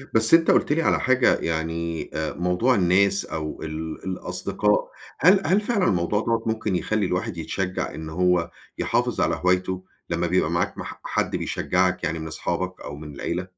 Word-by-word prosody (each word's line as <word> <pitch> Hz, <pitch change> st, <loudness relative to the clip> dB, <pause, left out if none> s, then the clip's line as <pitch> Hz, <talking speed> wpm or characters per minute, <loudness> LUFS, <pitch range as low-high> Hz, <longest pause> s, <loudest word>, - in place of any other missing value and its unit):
بس 110 Hz, +6 st, +7 dB
أنت 165 Hz, 0 st, +6 dB
قُلت -, -, +2 dB
لي 165 Hz, -, +1 dB
على -, -, +2 dB
حاجة 130 Hz, -1 st, +3 dB
يعني 80 Hz, 0 st, -3 dB
آآ 80 Hz, 0 st, -2 dB
موضوع 90 Hz, +9 st, +1 dB
الناس 100 Hz, +1 st, +3 dB
أو 75 Hz, -1 st, -5 dB
ال 80 Hz, 0 st, -5 dB
الأصدقاء، 105 Hz, +2 st, -1 dB, 0.3 s
هل 185 Hz, +6 st, +6 dB
-هل 190 Hz, +5 st, +4 dB
فعلًا 205 Hz, -4 st, +1 dB
الموضوع 90 Hz, +4 st, +1 dB
دوّة 115 Hz, 0 st, 0 dB
ممكن 110 Hz, -3 st, -1 dB
يخلّي 105 Hz, +2 st, 0 dB
الواحد 90 Hz, -1 st, -2 dB
يتشجّع 90 Hz, +3 st, -3 dB
إن 80 Hz, +1 st, -7 dB
هو 90 Hz, 0 st, +1 dB, 0.3 s
يحافظ -, -, 0 dB
على -, -, +2 dB
هوايته، 90 Hz, 0 st, +1 dB, 0.3 s
لما 85 Hz, +1 st, 0 dB
بيبقى 85 Hz, -2 st, +1 dB
معاك 85 Hz, +1 st, -1 dB
مح -, -, -7 dB
حد -, -, -1 dB
بيشجّعك 90 Hz, 0 st, 0 dB
يعني 80 Hz, -1 st, -1 dB
من 80 Hz, -, -6 dB
اصحابك، 90 Hz, +3 st, -3 dB
أو 75 Hz, -, -7 dB
من 75 Hz, -1 st, -9 dB
العيلة؟ 90 Hz, +5 st, -3 dB
90 Hz, 170 wpm, -24 LUFS, 85-105 Hz, 0.3 s, بس